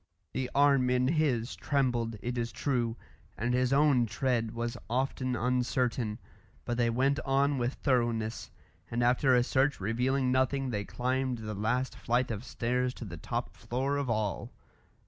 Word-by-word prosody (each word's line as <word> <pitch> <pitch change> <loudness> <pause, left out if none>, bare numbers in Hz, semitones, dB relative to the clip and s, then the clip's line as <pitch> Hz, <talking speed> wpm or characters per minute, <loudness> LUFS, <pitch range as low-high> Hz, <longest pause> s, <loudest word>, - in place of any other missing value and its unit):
The 130 -1 -2
arm 140 -3 +4
in 125 +1 +2
his 140 -7 +1
trembled, 120 -5 0
it 125 +1 -2
is 120 -1 -2
true, 120 -4 -1 0.4
and 120 +3 0
his 125 0 +2
own 135 -4 +4
tread 115 +1 0
was 120 0 -2
often 130 0 -1
uncertain, 125 -2 0 0.5
but 120 - -2
they 120 -1 +3
went 135 +5 +2
on 140 0 +2
with 120 +2 -1
thoroughness, 120 -4 0 0.4
and 120 +1 0
after 125 +2 +4
a 120 - +4
search 135 +3 +1
revealing 125 +6 +1
nothing 130 +1 +1
they 105 -2 -2
climbed 130 +2 -1
the 110 -1 -5
last 115 +6 -1
flight 120 +1 0
of 105 0 -4
stairs 125 +1 -1
to 120 - -7
the 85 -5 -7
top - - -4
floor 135 +4 -2
of 140 -3 -2
all. 110 -3 -1
125 Hz, 160 wpm, -30 LUFS, 115-130 Hz, 0.5 s, arm